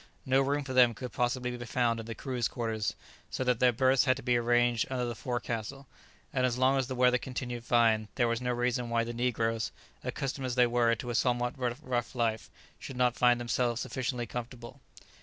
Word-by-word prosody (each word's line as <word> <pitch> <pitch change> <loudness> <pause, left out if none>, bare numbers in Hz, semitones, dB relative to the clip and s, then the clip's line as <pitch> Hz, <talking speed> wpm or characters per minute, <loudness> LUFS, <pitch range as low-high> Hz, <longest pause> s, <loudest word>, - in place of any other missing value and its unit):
No 130 +1 +3
room 145 +2 0
for 130 -1 -6
them 125 -2 +5
could 125 +2 -6
possibly 125 0 -1
be 120 - -6
found 120 -1 0
in 115 - -7
the 115 - -5
crew's 125 -3 -2
quarters, 110 -3 -2 0.3
so - - -2
that 125 -2 +1
their 125 -1 +5
berths 130 +3 +3
had 130 -1 +3
to 135 - -9
be 125 -1 +2
arranged 120 0 +2
under 125 -2 -1
the 120 - -3
forecastle; 120 +2 -4 0.5
and 130 - +1
as 125 -1 +1
long 130 +1 +3
as 130 - -1
the 130 - -4
weather 125 0 +4
continued 125 -2 -5
fine, 115 -3 +3
there 120 - +2
was 115 +1 -1
no 125 0 -1
reason 120 0 -1
why 115 0 +1
the 120 +1 -5
negroes, 115 -2 -1 0.3
accustomed 135 -1 -3
as 125 - -2
they 125 -1 +5
were 120 -1 +2
to 120 +2 -5
a - - -3
somewhat 120 +1 +1
rough 125 -1 -2
life, 115 -2 -1 0.3
should 130 - -8
not 125 -1 +2
find 120 -1 +4
themselves 120 0 0
sufficiently 125 -1 -3
comfortable. 120 +2 -8
120 Hz, 210 wpm, -30 LUFS, 120-130 Hz, 0.5 s, them